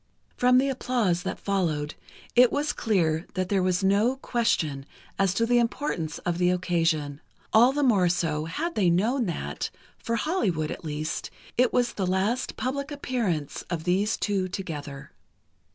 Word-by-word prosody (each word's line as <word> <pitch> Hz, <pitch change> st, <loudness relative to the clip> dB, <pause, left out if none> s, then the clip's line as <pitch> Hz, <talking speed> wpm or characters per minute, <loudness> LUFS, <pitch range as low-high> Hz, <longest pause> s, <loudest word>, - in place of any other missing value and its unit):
From 250 Hz, 0 st, +4 dB
the 265 Hz, +2 st, +3 dB
applause 245 Hz, -9 st, 0 dB
that -, -, -4 dB
followed, 160 Hz, -7 st, -1 dB, 0.4 s
it 245 Hz, 0 st, +7 dB
was 290 Hz, +1 st, 0 dB
clear 170 Hz, -7 st, 0 dB
that 185 Hz, -1 st, -1 dB
there 195 Hz, -2 st, +2 dB
was 185 Hz, +1 st, +1 dB
no 205 Hz, +6 st, +3 dB
question 180 Hz, -, -1 dB, 0.3 s
as 195 Hz, -2 st, +3 dB
to 230 Hz, -, +2 dB
the 240 Hz, +1 st, +3 dB
importance 230 Hz, -, -2 dB
of 175 Hz, -1 st, -1 dB
the 180 Hz, 0 st, +3 dB
occasion—all 170 Hz, -, +1 dB
the 290 Hz, +1 st, 0 dB
more 200 Hz, -9 st, +4 dB
so, 165 Hz, -3 st, 0 dB
had 315 Hz, -, -3 dB
they 195 Hz, -, +2 dB
known 225 Hz, +8 st, +1 dB
that, 170 Hz, -, -3 dB, 0.3 s
for 230 Hz, -, -2 dB
Hollywood, 210 Hz, -, 0 dB
at -, -, -7 dB
least, 155 Hz, 0 st, -3 dB, 0.3 s
it 250 Hz, 0 st, +3 dB
was 245 Hz, -1 st, +1 dB
the 190 Hz, -3 st, -2 dB
last 195 Hz, +7 st, 0 dB
public 280 Hz, +3 st, -2 dB
appearance 235 Hz, -, -2 dB
of 170 Hz, -2 st, -3 dB
these 190 Hz, +5 st, +1 dB
two 195 Hz, -3 st, 0 dB
together. 150 Hz, -7 st, -6 dB
190 Hz, 155 wpm, -26 LUFS, 165-245 Hz, 0.4 s, it